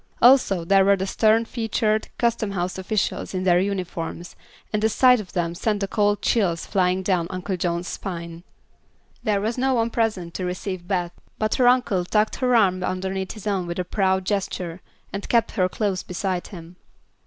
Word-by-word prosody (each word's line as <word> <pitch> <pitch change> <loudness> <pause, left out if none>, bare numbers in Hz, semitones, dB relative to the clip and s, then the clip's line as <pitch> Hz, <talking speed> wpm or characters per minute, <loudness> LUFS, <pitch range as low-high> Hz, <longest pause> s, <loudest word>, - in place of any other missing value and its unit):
Also 235 -9 +5
there 195 +2 +5
were 200 +1 +5
the 190 0 -3
stern 220 +3 +3
featured 220 -2 -1
custom 230 -3 0
house 180 0 -2
officials 195 0 -2
in 185 - -1
their 175 -1 +4
uniforms, 180 -3 -4 0.4
and 210 - +1
the 220 - +3
sight 250 +2 +5
of 200 -4 -9
them 170 -2 -1
sent 210 +4 -1
the 200 - -1
cold 205 0 +1
chills 180 -8 +1
flying 185 0 +1
down 180 -3 +1
Uncle 185 +1 -3
John's 175 0 -2
spine. 170 -3 -6 0.8
There 210 -2 +1
was 225 +4 -2
no 265 0 +2
one 230 0 +1
present 210 -8 -1
to 185 - -4
receive 180 0 -4
Beth, 180 -3 -1 0.3
but 215 0 0
her 245 - +6
uncle 245 -7 +3
tucked 210 +4 +1
her 250 -1 +2
arm 185 -5 +3
underneath 190 +1 -3
his 215 -2 -11
own 195 -4 -1
with 170 - -4
a 180 - 0
proud 190 0 +1
gesture 185 -3 -3 0.3
and 200 +1 -5
kept 230 -1 +2
her 185 -4 +1
close 195 -2 -1
beside 180 0 -3
him. 175 -1 -11
195 Hz, 185 wpm, -23 LUFS, 180-215 Hz, 0.8 s, her